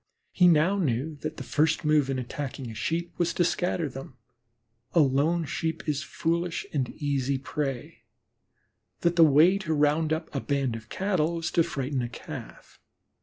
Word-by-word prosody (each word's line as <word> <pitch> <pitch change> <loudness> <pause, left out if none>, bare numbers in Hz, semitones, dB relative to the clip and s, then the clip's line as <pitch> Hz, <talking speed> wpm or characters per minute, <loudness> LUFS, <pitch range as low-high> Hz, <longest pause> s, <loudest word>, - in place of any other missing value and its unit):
He 180 - +5
now 175 +4 +4
knew 145 -1 -1
that 155 +1 -5
the - - -5
first 155 +1 +1
move 150 -3 +3
in 135 - -1
attacking 130 -1 -5
Sheep 170 +9 -2
was 170 -1 +1
to 175 - +3
scatter 175 -1 0
them; 135 -1 -9 0.8
a 170 - +4
lone 150 +4 +2
Sheep 165 +3 -3
is 150 -2 0
a - - -7
foolish 170 +1 -1
and 135 -5 0
easy 140 -2 -1
prey; 135 -1 -4 1.0
that 170 0 +2
the 170 - +7
way 160 +6 +6
to 160 -5 -1
round 150 +2 +2
up 160 +1 -2
a 135 - -2
band 140 -4 -1
of 110 0 -9
Cattle 180 -4 0
was 165 -1 -3
to 170 - +3
frighten 140 -5 -2
a 120 - -3
Calf. 115 - -10
150 Hz, 170 wpm, -27 LUFS, 135-170 Hz, 1.0 s, the